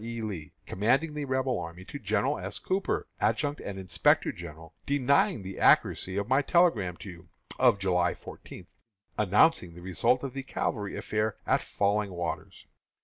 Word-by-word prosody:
E. 115 0 -5
Lee, 95 -9 -5
commanding 130 - +1
the 150 -1 -3
Rebel 130 -1 0
army, 85 +3 -8
to 145 - -8
General 110 +6 0
S. - - -5
Cooper, 190 +1 -1
Adjutant 145 -1 0
and 100 -1 -6
Inspector 95 -3 +2
General, 80 -1 -10
denying 140 - +2
the 95 0 -7
accuracy 95 +1 +3
of 100 0 -1
my 130 +3 +3
telegram 135 - +2
to 100 - -9
you, 85 -1 -15 0.3
of - - +5
July 90 -3 +1
fourteenth, - - -12 0.4
announcing 105 - +3
the 90 - -11
result 95 - +2
of 135 -3 -4
the 135 - -4
cavalry 105 -5 -3
affair 105 0 -1
at - - +2
Falling 100 -1 0
Waters. 85 -1 -5
105 Hz, 160 wpm, -28 LUFS, 95-135 Hz, 0.4 s, of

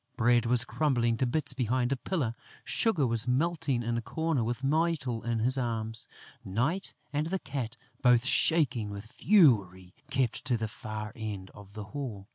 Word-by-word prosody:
Bread 120 -1 +3
was 125 0 +5
crumbling 120 -7 +1
to 130 - +1
bits 145 +2 +2
behind 125 0 0
a - - +2
pillar; 135 -4 -2 0.3
Sugar 185 -12 +1
was 115 0 +1
melting 135 -2 +1
in 115 0 -1
a - - -1
corner 160 +1 -1
with 120 +3 -3
Mytyl 145 -5 0
in 120 -1 -1
his 130 +4 +2
arms; 115 -2 -2 0.4
Night 135 - -1 0.2
and 150 +2 0
the 190 +3 -1
Cat, 135 -7 -5 0.2
both 125 -1 +4
shaking 135 -7 +2
with 100 +1 -7
fury, 105 - +3 0.2
kept 130 -4 0
to 125 -3 +1
the 110 0 -2
far 110 0 -6
end 105 -4 -6
of 100 -1 -14
the 105 -1 -6
hall. 115 -9 -5
120 Hz, 170 wpm, -29 LUFS, 110-140 Hz, 0.4 s, was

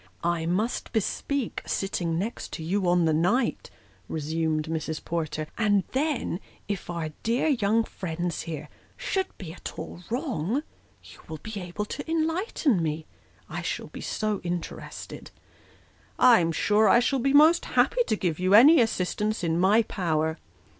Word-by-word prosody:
"I 170 -1 0
must 210 +8 -1
bespeak 245 +4 -1
sitting 175 -4 -1
next 215 +7 -4
you 180 +4 -1
on 175 -1 +3
the 160 - +3
night," 200 +11 +1 0.4
resumed 160 0 -1
Mrs. 160 -1 -4
Porter; 155 -2 -2
" - - -34
and 205 -3 +3
then, 275 - -1 0.3
if 200 -4 -4
our 170 -2 -3
dear 240 +7 +1
young 225 -4 +2
friends 175 -4 -4
here, 150 -2 -6 0.3
should 380 -1 -1
be 165 -4 -7
at - - -8
all 175 - -7
wrong, 245 - -1 0.4
you - - -14
will 155 - -6
be 220 -2 -5
able 180 +4 -4
to 285 +8 -6
enlighten 325 - +1
me. 155 0 -2 0.4
I - - -5
shall - - -4
be - - -9
so 215 -2 -2
interested." 175 -1 -6 0.5
" - - -32
I 245 -3 +7
am 165 -1 +1
sure 210 +6 +3
I 235 - +7
shall 265 +2 +1
be 270 +3 +1
most 310 +4 +6
happy - - +2
to - - +2
give 175 -6 -1
you 185 +2 +4
any 285 +7 +8
assistance 210 -1 -1
in 165 0 +1
my 205 +5 +5
power." 160 -5 -1
195 Hz, 160 wpm, -27 LUFS, 165-235 Hz, 0.5 s, any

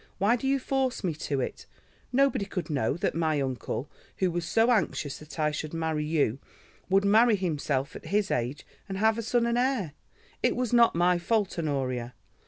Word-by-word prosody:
Why 205 +5 +3
do 255 +2 -3
you 275 +1 +3
force 265 -2 -1
me 175 -4 0 0.2
to 140 -2 +1
it? - - -5 0.4
Nobody 270 -5 +2
could 180 -4 -4
know 135 0 0
that 195 - 0
my 160 -2 +1
uncle, 130 0 -3 0.3
who 185 -2 +1
was 175 0 -2
so 225 +5 +3
anxious 165 - 0
that 150 -2 -12
I 150 -1 +1
should 155 +1 -5
marry 160 -2 -1
you, 145 -6 +1 0.5
would 195 +1 +3
marry 220 +3 +5
himself 150 -7 -2
at - - -9
his 205 0 +1
age, 125 +4 -2 0.2
and 190 - -3
have 220 +2 +2
a - - 0
son 235 +1 +1
and 235 +1 +1
heir. 250 - 0 0.5
It - - +2
was 245 -2 -1
not 235 -5 +5
my 175 +1 +3
fault, 205 0 0
Honoria. 130 -6 -2
175 Hz, 190 wpm, -28 LUFS, 150-225 Hz, 0.5 s, marry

